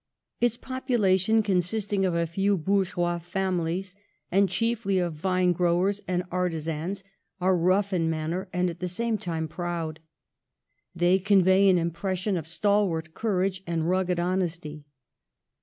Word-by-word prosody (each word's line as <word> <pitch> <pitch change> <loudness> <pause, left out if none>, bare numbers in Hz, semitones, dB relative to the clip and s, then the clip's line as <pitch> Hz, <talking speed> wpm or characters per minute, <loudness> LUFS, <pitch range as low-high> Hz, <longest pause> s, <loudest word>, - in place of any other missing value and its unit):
Its 240 -1 +2
population, 220 -6 +1
consisting 195 +1 0
of 175 - -1
a 170 0 +1
few 195 +4 +1
bourgeois 175 -1 0
families, 180 0 -2 0.4
and 195 +1 +3
chiefly 210 0 0
of 175 -2 0
vine 180 +3 +1
growers 180 +3 +1
and 180 0 0
ar 180 0 +1
tizans, 165 +4 -4 0.4
are 185 +1 +3
rough 190 +3 +2
in 165 -3 +1
manner 165 +4 -3
and 180 0 0
at 170 -1 -5
the 180 - -2
same 230 +6 -1
time 165 -5 -3
proud. 165 -1 -4 1.0
They 175 +2 +3
convey 195 0 +4
an 185 - +5
impression 185 +4 -1
of 160 -3 -4
stalwart 175 -3 0
courage 190 -3 -1
and 165 -1 -1
rugged 180 -1 +1
honesty. 170 -4 -2
180 Hz, 140 wpm, -26 LUFS, 170-195 Hz, 1.0 s, an